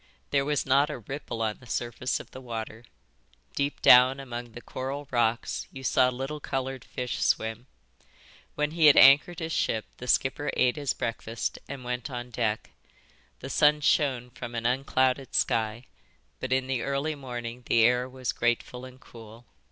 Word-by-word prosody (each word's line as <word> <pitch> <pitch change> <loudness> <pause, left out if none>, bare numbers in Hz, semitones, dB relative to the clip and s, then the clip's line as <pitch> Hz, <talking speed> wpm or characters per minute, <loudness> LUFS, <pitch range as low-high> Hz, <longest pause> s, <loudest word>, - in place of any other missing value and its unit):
There 140 -1 +2
was 150 -1 0
not 140 +3 +3
a 150 - -4
ripple 120 -1 -5
on 110 -1 -2
the 125 - -16
surface 120 +2 -2
of - - -12
the 130 - -10
water. 115 -1 -6 0.7
Deep 140 +1 -2
down 125 +2 +7
among 120 -3 -7
the 120 - -8
coral 135 +2 -5
rocks 120 -1 0
you 135 - -9
saw 130 -1 +3
little 135 +4 -5
coloured 135 -2 -4
fish 125 -1 -4
swim. 110 +3 0 0.9
When 150 0 0
he 160 -1 +4
had 145 - +7
anchored 145 +6 +7
his 165 -1 -4
ship 110 -7 0
the 125 - -8
skipper 130 +4 +1
ate 125 -1 +3
his 145 -3 -1
breakfast 115 0 -4
and 135 -2 -7
went 125 +1 -4
on 125 -1 -6
deck. 110 -2 -2 0.7
The - - -6
sun 150 0 +4
shone 130 -5 +1
from 120 -1 -8
an 115 0 -3
unclouded 130 +1 +1
sky, 115 +2 0 0.5
but 130 - -5
in 130 0 +2
the 130 -2 -2
early 140 +4 -1
morning 120 -3 -6
the 115 -1 +4
air 125 +2 +3
was 130 -1 -3
grateful 120 +1 -1
and 130 0 -13
cool. 115 -1 -14
125 Hz, 170 wpm, -27 LUFS, 120-135 Hz, 0.9 s, down